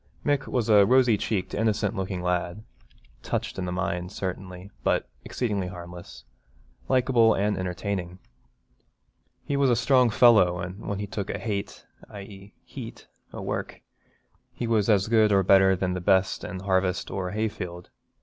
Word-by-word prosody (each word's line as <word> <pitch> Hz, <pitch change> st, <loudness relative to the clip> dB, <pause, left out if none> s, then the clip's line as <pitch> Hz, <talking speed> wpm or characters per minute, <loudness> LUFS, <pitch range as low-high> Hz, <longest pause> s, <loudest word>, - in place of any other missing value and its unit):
Mick 145 Hz, -2 st, +1 dB
was 120 Hz, -3 st, -1 dB
a 105 Hz, -2 st, +6 dB
rosy 125 Hz, +1 st, +4 dB
cheeked, 100 Hz, -2 st, -2 dB
innocent 105 Hz, -1 st, 0 dB
looking 95 Hz, -2 st, -3 dB
lad, 90 Hz, +3 st, -2 dB, 0.6 s
touched -, -, -3 dB
in 95 Hz, -, -2 dB
the 90 Hz, -, -3 dB
mind, 90 Hz, 0 st, -3 dB
certainly, 95 Hz, 0 st, -6 dB
but -, -, +1 dB, 0.2 s
exceedingly 105 Hz, -7 st, -2 dB
harmless, 90 Hz, -1 st, -10 dB, 0.7 s
likeable 125 Hz, -3 st, +4 dB
and 105 Hz, +2 st, 0 dB
entertaining. 90 Hz, 0 st, -4 dB, 1.3 s
He 140 Hz, -, -1 dB
was 140 Hz, -1 st, +3 dB
a 120 Hz, -, +4 dB
strong 125 Hz, 0 st, +3 dB
fellow 105 Hz, -6 st, +5 dB
and 90 Hz, +4 st, -7 dB
when 100 Hz, -, -2 dB
he 105 Hz, -, -3 dB
'took 100 Hz, 0 st, -5 dB
a -, -, -2 dB
hate 100 Hz, -3 st, -5 dB, 0.2 s
(i.e. 100 Hz, 0 st, -11 dB
heat) -, -, -9 dB, 0.3 s
o' -, -, -7 dB
work' -, -, -4 dB, 0.7 s
he -, -, -5 dB
was 115 Hz, -2 st, +1 dB
as 100 Hz, -2 st, +3 dB
good 110 Hz, -1 st, +4 dB
or 100 Hz, -1 st, +4 dB
better 95 Hz, 0 st, +5 dB
than 90 Hz, 0 st, -1 dB
the 90 Hz, -, -4 dB
best 95 Hz, +2 st, +2 dB
in 95 Hz, 0 st, -6 dB
harvest 95 Hz, -1 st, 0 dB
or 95 Hz, -1 st, -3 dB
hayfield. 95 Hz, -4 st, -4 dB
100 Hz, 155 wpm, -26 LUFS, 90-110 Hz, 1.3 s, a